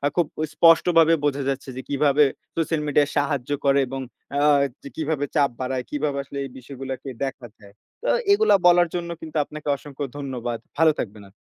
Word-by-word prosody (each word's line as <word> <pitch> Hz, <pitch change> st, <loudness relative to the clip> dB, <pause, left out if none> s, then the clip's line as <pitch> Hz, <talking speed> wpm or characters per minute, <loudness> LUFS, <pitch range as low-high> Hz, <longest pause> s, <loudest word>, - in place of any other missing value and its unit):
খুব 175 Hz, -, +3 dB, 0.3 s
স্পষ্টভাবে 165 Hz, 0 st, +5 dB
বোঝা 140 Hz, -1 st, 0 dB
যাচ্ছে 135 Hz, 0 st, -3 dB
যে 130 Hz, -, -3 dB
কিভাবে 145 Hz, +1 st, +3 dB, 0.3 s
সোশ্যাল 165 Hz, -1 st, 0 dB
মিডিয়া 145 Hz, 0 st, +3 dB
সাহায্য 145 Hz, -2 st, -1 dB
করে। 140 Hz, 0 st, +4 dB
এবং 135 Hz, +1 st, -5 dB, 0.4 s
আ -, -, +2 dB, 0.4 s
ক -, -, -21 dB
কিভাবে 155 Hz, -2 st, -1 dB
চাপ 140 Hz, -2 st, +4 dB
বাড়ায় 130 Hz, 0 st, -2 dB
কিভাবে 145 Hz, -1 st, -1 dB
আসলে 140 Hz, +1 st, -9 dB
এই -, -, -8 dB
বিষয়গুলোকে 135 Hz, +1 st, -7 dB, 0.2 s
দেখা 135 Hz, -2 st, -6 dB
যায়। 100 Hz, -1 st, -16 dB, 0.3 s
তো -, -, 0 dB, 0.2 s
এগুলো 430 Hz, -, +4 dB
বলার 175 Hz, 0 st, +6 dB
জন্য 170 Hz, -1 st, -3 dB
কিন্তু 160 Hz, -1 st, -5 dB
আপনাকে 150 Hz, 0 st, -10 dB
অসংখ্য 145 Hz, +1 st, -8 dB
ধন্যবাদ। 125 Hz, -4 st, -4 dB, 0.2 s
ভালো 160 Hz, 0 st, +5 dB
থাকবেন 105 Hz, -1 st, -5 dB
আপনি। -, -, -26 dB
145 Hz, 175 wpm, -23 LUFS, 135-155 Hz, 0.4 s, বলার